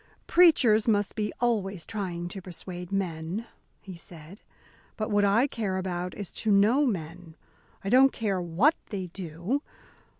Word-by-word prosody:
"Preachers 255 -12 +5
must 205 -2 +2
be 210 -1 -2
always 200 -8 0
trying 180 -5 -4
to 195 +1 -7
persuade 180 0 -8
men," 180 +2 -3 0.4
he 190 -2 -9
said. 170 +3 -12 0.6
"But 215 0 -3
what 205 0 +3
I 205 +6 +4
care 210 -8 -2
about 180 -1 -3
is 200 -3 -7
to 220 - -2
know 225 +9 +4
men. 165 -4 -5 0.5
I 195 - -2
don't 265 +4 +6
care 200 -5 -1
what 180 - +3
they 190 -3 -5
do. 180 - -3
195 Hz, 145 wpm, -27 LUFS, 175-220 Hz, 0.6 s, don't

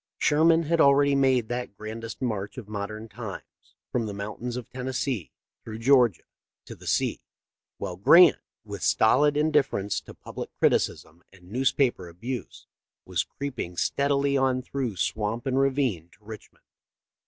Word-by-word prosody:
Sherman 165 +2 +4
had 165 +1 +2
already 140 0 +5
made 130 -4 +2
that 120 -4 -4
grandest 115 +3 -7
march 105 -4 -3
of 120 -5 -8
modern 110 +1 -5
times, - - -10 0.2
from 115 -3 -1
the 100 - -5
mountains 110 +4 -5
of 125 - -7
Tennessee 125 - -3 0.3
through 110 -1 -7
Georgia 120 -4 +3 0.4
to - - -9
the - - -13
sea, - - 0 0.6
while 90 -3 -5
Grant, 155 - +7 0.3
with 100 -2 -8
stolid 145 +6 +3
indifference 140 -10 +1
to - - -13
public - - -8
criticism 80 +3 0
and 90 -1 -18
newspaper 125 -6 +1
abuse, 120 +9 -7 0.4
was 90 -3 0
creeping 125 - -6
stead 140 +10 0
ily 140 0 +2
on 130 -1 +1
through 130 -6 -3
swamp 105 +5 -2
and 135 0 +1
ravine 130 - 0
to 105 - -25
Richmond. 110 0 -12
120 Hz, 145 wpm, -26 LUFS, 105-140 Hz, 0.6 s, Grant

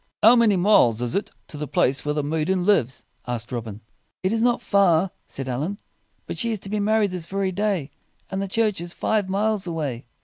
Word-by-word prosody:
"How 230 +3 +8
many 230 -4 +4
miles 175 - +4
is 120 - -1
it 200 - -1 0.2
to 150 - -8
the 150 0 -4
place 135 0 +1
where 150 0 -1
the 150 - 0
maiden 160 +5 0
lives?" 135 - +1 0.2
asked 120 0 -4
Robin. 110 -4 -5 0.4
"It 185 +3 +1
is 225 - 0
not 240 0 +3
far," 190 -3 +3 0.2
said 135 -1 -6
Allin. 145 +11 -2 0.5
"But - - -6
she 235 - 0
is 220 - -2
to 195 - -7
be 215 - 0
married 210 -1 +2
this 175 -2 -5
very 195 0 -1
day, 190 -7 -1 0.4
and 190 0 -2
the 195 - -2
church 210 -2 0
is 175 0 -6
five 210 -3 0
miles 205 0 0
away." 145 -8 -4
185 Hz, 210 wpm, -23 LUFS, 145-205 Hz, 0.5 s, How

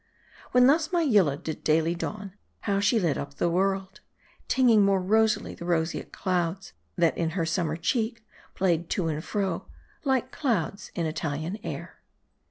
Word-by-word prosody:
When 250 0 +6
thus 310 +4 +3
my 345 -2 +2
Yillah 200 - +3
did 155 +1 -6
daily 160 +2 +2
dawn, 195 +2 -5 0.3
how 200 -1 0
she 210 +3 +3
lit 170 -7 0
up 140 0 -7
my - - +2
world; 190 +2 0 0.5
tinging 240 -5 +5
more 195 -1 +3
rosily 215 +3 +2
the - - -9
roseate 165 -1 -1
clouds, 180 0 -2 0.2
that 165 -2 +2
in 165 -1 0
her 165 - +1
summer 160 -1 -1
cheek 225 +5 -1 0.3
played 170 -3 +1
to 170 -4 0
and 155 0 -3
fro, 195 -5 -2 0.4
like 260 -2 +1
clouds 205 - -1
in 170 - -1
Italian 160 +4 -3
air. - - -7
190 Hz, 160 wpm, -27 LUFS, 165-220 Hz, 0.5 s, When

